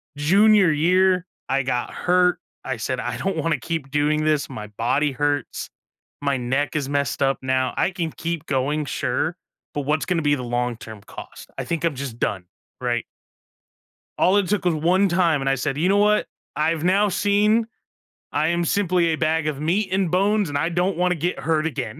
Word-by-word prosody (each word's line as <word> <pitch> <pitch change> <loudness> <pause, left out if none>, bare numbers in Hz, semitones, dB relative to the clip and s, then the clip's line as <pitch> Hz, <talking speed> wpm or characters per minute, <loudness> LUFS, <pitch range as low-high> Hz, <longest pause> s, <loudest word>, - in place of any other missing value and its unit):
Junior 195 +5 +5
year, 180 +4 +3 0.2
I 135 0 +1
got 125 -2 -2
hurt. 180 -1 +2 0.2
I 130 -2 -3
said, 125 +3 -3
"I 120 -1 -3
don't 190 +6 -2
wanna 160 -2 0
keep 140 0 -4
doing 150 +1 +1
this. 155 -2 +1
My 105 -1 -7
body 120 +8 0
hurts. 145 +1 -2 0.5
My 140 -1 0
neck 130 +5 -1
is 140 -3 -1
messed 140 -1 -1
up 135 0 +2
now. 130 -1 0
I - - +2
can 170 -3 -3
keep 165 -1 -4
going, 145 +1 -1
sure, - - -2 0.4
but 145 - -2
what's 150 +3 0
gonna 170 -3 0
be 145 -1 +3
the 130 - -5
long-term 120 -3 -3
cost? - - -11
I - - -2
think 165 -2 -3
I'm 165 -4 +1
just 130 -3 -6
done," 95 -3 -2 0.4
right? 120 -2 -1 1.1
All 190 +3 +4
it 200 -3 +1
took 205 -1 -1
was 175 - +3
1 175 +6 +2
time, 170 -5 +2
and 135 - 0
I 135 - +2
said, 135 +1 -2
"You 170 +5 +2
know 200 - +4
what? 210 +1 +3 0.3
I've 160 +1 0
now 195 +4 +3
seen 210 +4 +2 0.6
I 150 +2 +1
am 170 +1 0
simply 180 -1 +2
a 160 - +1
bag 160 0 0
of 145 -3 -2
meat 185 +7 0
and 190 -2 +1
bones, 200 +1 +2
and 145 - -2
I 160 +4 0
don't 180 +1 0
wanna 180 0 +2
get 175 +3 -2
hurt 160 -1 0
again." 145 -2 -5
155 Hz, 195 wpm, -23 LUFS, 135-180 Hz, 1.1 s, Junior